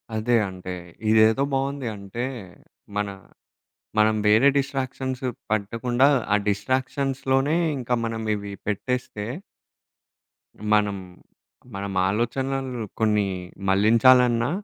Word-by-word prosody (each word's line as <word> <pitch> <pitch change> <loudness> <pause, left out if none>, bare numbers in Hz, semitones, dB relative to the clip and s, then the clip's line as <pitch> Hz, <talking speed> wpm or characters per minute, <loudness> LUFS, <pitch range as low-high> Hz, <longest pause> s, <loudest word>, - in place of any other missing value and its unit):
అదే 115 +3 +1
అంటే, 95 0 -7 0.4
ఇదేదో 110 +4 +5
బావుంది. 135 -1 -1
అంటే, 100 +5 -5 0.7
మన 105 -1 0 0.9
మనం 110 0 +4
వేరే 110 +6 +6
డిస్ట్రాక్షన్స్ 130 -1 -2 0.3
పట్టకుండా 115 +5 +1 0.3
ఆ - - +6
డిస్ట్రాక్షన్స్‌లోనే 135 +6 0 0.2
ఇంకా 125 -1 -1
మనం 115 0 -3
ఇవి 100 -1 -6
పెట్టేస్తే. 105 0 -2 1.5
మనం 105 -1 +3 0.8
మనం 100 0 -4 0.2
ఆలోచనలను 130 +3 -2 0.2
కొన్ని 105 -2 +2 0.4
మళ్లించాలన్నా 115 +4 +5
115 Hz, 85 wpm, -24 LUFS, 105-130 Hz, 1.5 s, వేరే